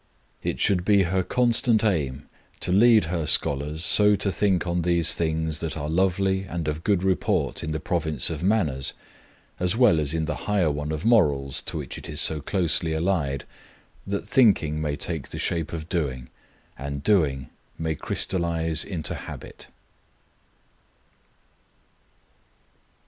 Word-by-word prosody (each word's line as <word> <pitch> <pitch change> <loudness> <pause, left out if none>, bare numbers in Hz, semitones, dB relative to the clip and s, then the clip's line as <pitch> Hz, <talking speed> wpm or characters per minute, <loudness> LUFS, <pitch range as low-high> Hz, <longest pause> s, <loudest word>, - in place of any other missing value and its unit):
It - - -3
should 90 -3 +1
be 100 0 +4
her 95 +2 0
constant 120 +1 +2
aim 75 -9 -1 0.3
to - - -1
lead 110 +3 +5
her 80 -2 -3
scholars 75 +5 +3
so 105 +4 +6
to 100 0 -1
think 95 0 +1
on 85 0 -1
these 85 -1 +2
things 80 -1 -1
that 80 -1 -4
are 75 -1 -4
lovely 95 +2 +1
and 85 -3 -5
of 75 +2 -3
good 100 -3 +1
report 95 -2 0
in 80 - -3
the 80 - -2
province 80 -6 -1
of 80 - -5
manners, 85 -9 +1 0.7
as 90 +4 0
well 120 -10 +5
as 75 +1 0
in 80 -1 -1
the 75 -2 -3
higher 95 -7 +2
one 75 +1 -4
of 80 +3 -4
morals, 70 - +2
to - - -2
which - - -6
it - - -10
is - - -5
so 75 -2 0
closely 85 -1 +1
allied, 80 -5 -1 0.6
that 100 0 -3
thinking 80 - +3
may 75 -2 -2
take 80 -2 -4
the - - -7
shape 85 -2 -2
of 80 -1 -6
doing, 65 -8 -3 0.5
and 70 +1 -5
doing 75 - +1 0.3
may 80 -1 -2
crystallize 80 0 -1
into 85 -6 -3
habit. - - -9
85 Hz, 150 wpm, -24 LUFS, 75-95 Hz, 0.7 s, so